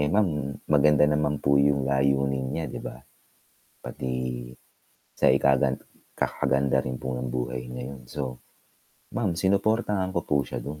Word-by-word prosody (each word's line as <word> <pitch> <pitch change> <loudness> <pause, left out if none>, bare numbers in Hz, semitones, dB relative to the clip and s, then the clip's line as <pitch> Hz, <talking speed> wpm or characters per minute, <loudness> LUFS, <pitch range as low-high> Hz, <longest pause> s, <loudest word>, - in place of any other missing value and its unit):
Eh 75 - +2
ma'am, 105 -3 +4 0.4
maganda 75 0 +5
naman 75 0 +1
po 70 0 +5
yung 70 -1 +3
layunin 70 0 +1
niya, 80 +4 -2
'di - - -6
ba? - - -7 0.9
Pati 65 - -5 1.1
sa - - +6
ikagan 65 0 +3 0.3
ikakaganda 65 0 +1
rin 65 0 -3
po - - -4
ng 60 +1 -3
buhay 60 0 -2
na 60 - -5
yun. 70 -2 -9
So 75 - -3 1.0
ma'am, 100 -6 +1
sinuportahan 100 +1 +1
ko 85 - +2
po 75 - +3
siya - - -5
dun. 75 +2 -7
70 Hz, 150 wpm, -26 LUFS, 65-75 Hz, 1.1 s, sa